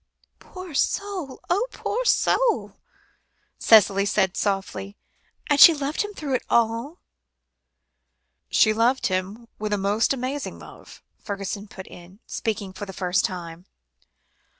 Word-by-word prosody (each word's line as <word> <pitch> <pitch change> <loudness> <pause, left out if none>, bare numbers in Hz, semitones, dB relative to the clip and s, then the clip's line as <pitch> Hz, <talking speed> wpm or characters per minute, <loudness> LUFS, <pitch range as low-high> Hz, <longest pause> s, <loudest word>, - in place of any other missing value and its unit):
"Poor 365 -3 -10
soul! 365 -2 -2
oh, 405 +8 +1
poor 485 +4 -3
soul!" - - +2 0.9
Cicely 200 -3 +5
said 195 -2 +1
softly. 195 0 -3 0.5
"And 290 -1 +2
she 330 - +10
loved 290 +1 -2
him 415 -1 -5
through 285 -3 -4
it 255 - 0
all?" 235 +7 +1 1.5
"She 215 - +4
loved 235 +4 +1
him 195 +6 -4
with 210 0 -2
a - - +1
most 200 +3 +1
amazing 270 +2 -3
love," - - -14 0.2
Fergusson 200 0 -5
put 190 -2 -10
in, 175 +2 -14
speaking 205 -4 -4
for 205 - -7
the 190 - -8
first 185 +1 0
time. 175 -2 -7
220 Hz, 125 wpm, -24 LUFS, 195-285 Hz, 1.5 s, she